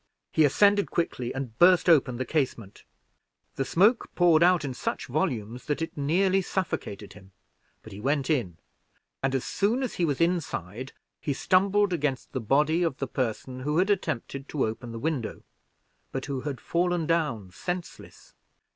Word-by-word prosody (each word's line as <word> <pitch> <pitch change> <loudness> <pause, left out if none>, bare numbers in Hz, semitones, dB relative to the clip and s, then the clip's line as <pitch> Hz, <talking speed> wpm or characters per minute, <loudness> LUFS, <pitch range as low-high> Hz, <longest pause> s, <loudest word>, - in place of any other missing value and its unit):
He 155 - +4
ascended 200 +7 +4
quickly, 125 -8 -2
and 135 -4 -5
burst 180 0 +6
open 135 -7 +4
the 130 - -2
casement 125 -10 -2 0.7
the 135 - -1
smoke 205 - +3
poured 170 -3 +5
out 175 -2 +4
in 135 - -3
such - - -3
volumes 120 -4 -2
that 150 - -1
it 165 - -4
neatly 185 +7 +2
suffocated 135 - -4
him, 95 -2 -16 0.5
but 110 - -11
he 100 - -8
went 140 +3 0
in; 120 - 0 0.6
and 135 0 0
as 135 - 0
soon 225 +7 0
as 255 - -3
he - - +4
was 145 -4 -1
inside, 135 - -1 0.3
he 145 - -2
stumbled 195 +5 +2
against 145 -5 -2
the 130 - -2
body 150 +8 +2
of 165 -6 0
the 135 - -3
person 125 0 -3
who 150 +4 -1
had 190 +4 +3
attempted 140 - -3
to 145 - 0
open 115 +2 -5
the 115 - -6
window, 135 -3 -3 0.7
but 135 - -4
who 140 -3 -3
had 140 -4 -4
fallen 175 +2 0
down 150 - -1
senseless. 175 - -7
145 Hz, 165 wpm, -27 LUFS, 125-175 Hz, 0.7 s, burst